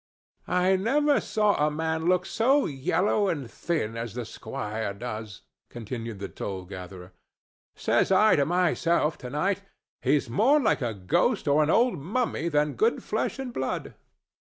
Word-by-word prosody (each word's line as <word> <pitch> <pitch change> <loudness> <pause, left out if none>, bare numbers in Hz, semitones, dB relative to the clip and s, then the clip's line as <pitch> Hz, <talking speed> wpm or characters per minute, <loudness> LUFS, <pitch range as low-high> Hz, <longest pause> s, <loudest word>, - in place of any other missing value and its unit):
"I 185 +1 +3
never 285 +8 +2
saw 210 -2 +2
a 150 - +3
man 160 +1 -2
look 180 0 +2
so 250 +9 +2
yellow 180 +8 +1
and 145 -9 -2
thin 150 -10 -2
as 115 -1 -5
the 120 -1 -4
squire 110 -5 -5
does," 110 -2 -6 0.3
continued 115 -1 -6
the 100 - -5
toll 95 -2 -6
gatherer. 90 -1 -9 0.6
"Says - - +1
I 210 +3 +5
to 140 - +2
myself 170 -2 +1
tonight, 150 +11 -1 0.4
'He's 145 -2 +2
more 235 - +3
like 220 - +1
a 115 -3 -2
ghost 170 - +1
or 145 +2 +4
an 150 - +1
old 235 - +3
mummy 180 - -1
than 150 -1 +1
good 445 +3 +1
flesh - - -2
and 265 -2 -5
blood. 130 - -3
155 Hz, 150 wpm, -27 LUFS, -, 0.6 s, I